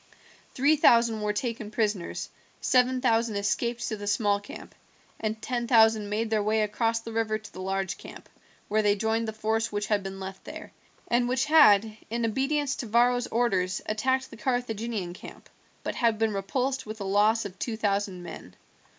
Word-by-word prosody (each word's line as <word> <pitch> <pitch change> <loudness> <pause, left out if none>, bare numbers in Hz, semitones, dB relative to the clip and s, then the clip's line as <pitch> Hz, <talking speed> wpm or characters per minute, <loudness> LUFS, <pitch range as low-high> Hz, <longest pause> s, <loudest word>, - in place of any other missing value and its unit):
Three 290 +4 +4
thousand 235 -5 +4
were 210 0 0
taken 225 0 -3
prisoners, 210 -5 -2 0.3
seven 255 0 +2
thousand 230 -3 +2
escaped 235 +4 -1
to 220 - -2
the 205 -1 -7
small 205 -1 +2
camp, 205 - -11 0.5
and 220 0 -2
ten 240 -2 -2
thousand 220 -3 +4
made 220 +2 -2
their 215 -1 +2
way 215 +1 +1
across 225 +2 0
the 230 - -8
river 220 -1 0
to 215 -1 -14
the 185 - -8
large 190 0 -2
camp, - - -11 0.4
where 215 +1 +2
they 205 -1 +3
joined 225 +2 0
the - - -2
force 220 +1 -1
which 205 0 -2
had 210 -1 +1
been 195 0 -7
left 190 0 -7
there, - - -9 0.4
and 240 0 +2
which 255 +1 +1
had, 220 -9 +5
in 235 +1 -1
obedience 275 +4 0
to 240 - -5
Varro's 245 +2 +3
orders, 195 -6 0
attacked 260 +5 0
the - - -10
Carthaginian 225 -5 -2
camp, - - -12 0.4
but - - -3
had 230 -3 +1
been 220 -1 +1
repulsed 255 +7 -1
with 215 +1 -7
a - - -4
loss 205 +3 +2
of 190 -1 -8
two 225 -3 -3
thousand 200 -3 -1
men. 90 - -10
220 Hz, 185 wpm, -27 LUFS, 205-235 Hz, 0.5 s, had